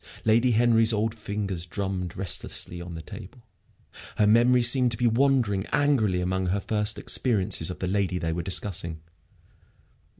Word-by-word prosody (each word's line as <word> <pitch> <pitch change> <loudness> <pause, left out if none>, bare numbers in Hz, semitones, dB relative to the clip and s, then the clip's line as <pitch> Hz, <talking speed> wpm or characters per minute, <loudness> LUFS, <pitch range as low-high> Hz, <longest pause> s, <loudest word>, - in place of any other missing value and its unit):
Lady 115 +3 +3
Henry's 115 0 +3
old 110 +1 -1
fingers 100 -5 -5
drummed 95 -1 -4
restlessly 90 -2 -2
on 85 -1 -8
the 80 - -8
table. - - -11 0.7
Her 105 - +3
memory 120 +3 +4
seemed 125 +1 +3
to - - -6
be 125 - -1
wandering 120 -5 +1
angrily 110 -11 +1
among 95 +1 -2
her 95 +3 0
first 105 +1 -1
experiences 100 -8 0
of 90 - -6
the 90 - -4
lady 95 -1 -1
they 80 -2 -2
were 85 - -3
discussing. 85 -3 -1
100 Hz, 155 wpm, -25 LUFS, 90-115 Hz, 0.7 s, memory